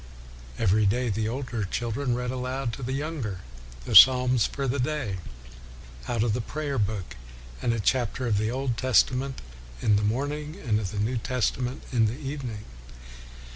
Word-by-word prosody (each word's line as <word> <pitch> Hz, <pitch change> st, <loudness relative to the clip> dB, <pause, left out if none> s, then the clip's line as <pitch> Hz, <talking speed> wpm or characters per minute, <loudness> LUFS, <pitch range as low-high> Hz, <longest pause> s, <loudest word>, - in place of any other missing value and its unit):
Every 105 Hz, 0 st, +3 dB
day 125 Hz, +4 st, +1 dB
the 110 Hz, +1 st, -1 dB
older 125 Hz, -3 st, -3 dB
children 120 Hz, +6 st, -2 dB
read 125 Hz, 0 st, -2 dB
aloud 130 Hz, -1 st, -3 dB
to 135 Hz, -, -7 dB
the 125 Hz, +1 st, -3 dB
younger 135 Hz, -, -3 dB, 0.4 s
the -, -, -4 dB
Psalms 125 Hz, -2 st, +8 dB
for 140 Hz, -1 st, -3 dB
the 130 Hz, +2 st, -1 dB
day, 125 Hz, -7 st, -1 dB, 0.9 s
out 115 Hz, -2 st, 0 dB
of 115 Hz, -3 st, +1 dB
the 125 Hz, -, -1 dB
prayer 140 Hz, +2 st, -3 dB
book, 100 Hz, -, -2 dB, 0.5 s
and 120 Hz, -, +1 dB
a 115 Hz, -, -1 dB
chapter 125 Hz, +3 st, 0 dB
of 105 Hz, -4 st, +1 dB
the 110 Hz, +1 st, 0 dB
Old 130 Hz, -1 st, -2 dB
Testament 130 Hz, -, +2 dB, 0.4 s
in 105 Hz, -, +3 dB
the 105 Hz, -, 0 dB
morning, 145 Hz, +7 st, -2 dB
and 110 Hz, -, 0 dB
of 100 Hz, -4 st, -3 dB
the 105 Hz, -, -6 dB
New 110 Hz, +5 st, 0 dB
Testament 125 Hz, +1 st, -2 dB
in 115 Hz, -3 st, +3 dB
the 115 Hz, +4 st, -3 dB
evening. 135 Hz, -7 st, -6 dB
125 Hz, 170 wpm, -26 LUFS, 110-135 Hz, 0.9 s, Psalms